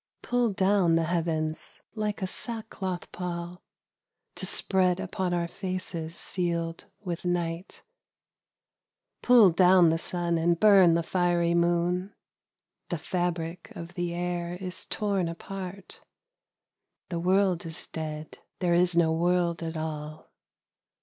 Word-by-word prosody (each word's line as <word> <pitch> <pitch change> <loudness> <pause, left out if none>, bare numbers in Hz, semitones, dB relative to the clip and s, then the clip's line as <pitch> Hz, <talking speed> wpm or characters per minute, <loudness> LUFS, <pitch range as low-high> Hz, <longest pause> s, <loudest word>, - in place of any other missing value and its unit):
Pull 245 -3 +1
down 190 -3 +3
the 165 - +2
heavens 160 -2 -2
like 210 -2 -2
a - - +2
sackcloth 195 -4 -4
pall 175 0 -5 0.7
To - - -5
spread 185 -2 +2
upon 190 -1 -2
our 170 -1 0
faces 185 -3 -4
sealed 170 -2 -3 0.2
with 175 -4 -4
night. 175 0 -3 1.4
1'ull 225 -9 +6
down 180 -2 +6
the 165 - 0
sun 170 -1 -1
and 170 +1 +2
burn 195 -5 +7
the 170 - +1
fiery 175 -1 +1
moon; 175 +3 +1 0.7
The 175 - -1
fabric 175 0 -3
of 170 +1 -8
the 175 -1 -2
air 175 0 -2
is 185 0 -5
torn 200 -4 -1
apart: 185 +2 -7 1.1
The 170 -2 -2
world 185 0 +2
is 160 +1 -7
dead. 155 -1 -6 0.2
There 175 -2 +1
is 175 0 +3
no 165 -2 +4
world 175 0 +1
at 165 -1 -4
all. 155 -1 -6
175 Hz, 125 wpm, -28 LUFS, 170-185 Hz, 1.4 s, burn